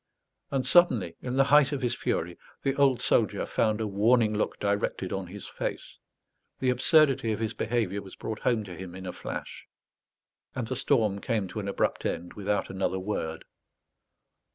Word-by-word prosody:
And 135 Hz, -2 st, -1 dB
suddenly, 125 Hz, -, +4 dB
in 125 Hz, 0 st, -3 dB
the 135 Hz, -, +5 dB
height 145 Hz, 0 st, +5 dB
of 140 Hz, -3 st, -3 dB
his 120 Hz, -1 st, +1 dB
fury, 85 Hz, -6 st, -2 dB, 0.3 s
the 135 Hz, -1 st, +1 dB
old 135 Hz, -3 st, +3 dB
soldier -, -, +2 dB
found 110 Hz, -1 st, +1 dB
a 110 Hz, -, -1 dB
warning 110 Hz, +2 st, +3 dB
look 105 Hz, -, -1 dB
directed 100 Hz, -2 st, -1 dB
on 95 Hz, -2 st, -3 dB
his 100 Hz, +2 st, -8 dB
face; -, -, -5 dB, 0.6 s
the 130 Hz, -1 st, +1 dB
absurdity 135 Hz, -2 st, +4 dB
of 105 Hz, -, -2 dB
his 110 Hz, 0 st, -1 dB
behaviour 110 Hz, -4 st, -1 dB
was 95 Hz, -, -11 dB
brought 110 Hz, -1 st, -5 dB
home 115 Hz, -3 st, +1 dB
to 90 Hz, -3 st, -9 dB
him 90 Hz, 0 st, -8 dB
in 95 Hz, 0 st, -8 dB
a 90 Hz, -, -5 dB
flash; -, -, -7 dB, 0.9 s
and 125 Hz, -, -2 dB
the 130 Hz, -, -2 dB
storm 110 Hz, -7 st, +1 dB
came 110 Hz, -6 st, -1 dB
to 110 Hz, -, -5 dB
an 100 Hz, -, -4 dB
abrupt 100 Hz, -, 0 dB
end, 85 Hz, +1 st, -3 dB
without 105 Hz, 0 st, -1 dB
another 95 Hz, 0 st, -1 dB
word. 95 Hz, -4 st, -3 dB
110 Hz, 175 wpm, -28 LUFS, 95-125 Hz, 0.9 s, the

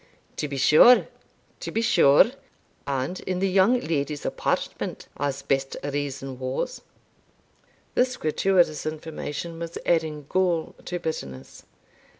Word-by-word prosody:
"To 150 Hz, -, -2 dB
be 140 Hz, -1 st, -5 dB
sure 155 Hz, -, +7 dB, 0.5 s
to -, -, -5 dB
be 225 Hz, -, 0 dB
sure 145 Hz, -, +5 dB, 0.6 s
and 140 Hz, +6 st, -2 dB
in 185 Hz, -1 st, -3 dB
the 195 Hz, +2 st, +1 dB
young 195 Hz, +6 st, +4 dB
lady's 150 Hz, -, -2 dB
apartment, -, -, -2 dB
as 140 Hz, -1 st, -2 dB
best 135 Hz, 0 st, -1 dB
reason 140 Hz, -2 st, -4 dB
was." 130 Hz, -, -3 dB, 1.1 s
This 255 Hz, 0 st, +1 dB
gratuitous 155 Hz, -1 st, +1 dB
information 155 Hz, +1 st, -5 dB
was 170 Hz, 0 st, -5 dB
adding 155 Hz, -3 st, 0 dB
gall 175 Hz, -3 st, 0 dB
to 180 Hz, -, -3 dB
bitterness. 70 Hz, -, -6 dB
155 Hz, 120 wpm, -25 LUFS, 140-180 Hz, 1.1 s, sure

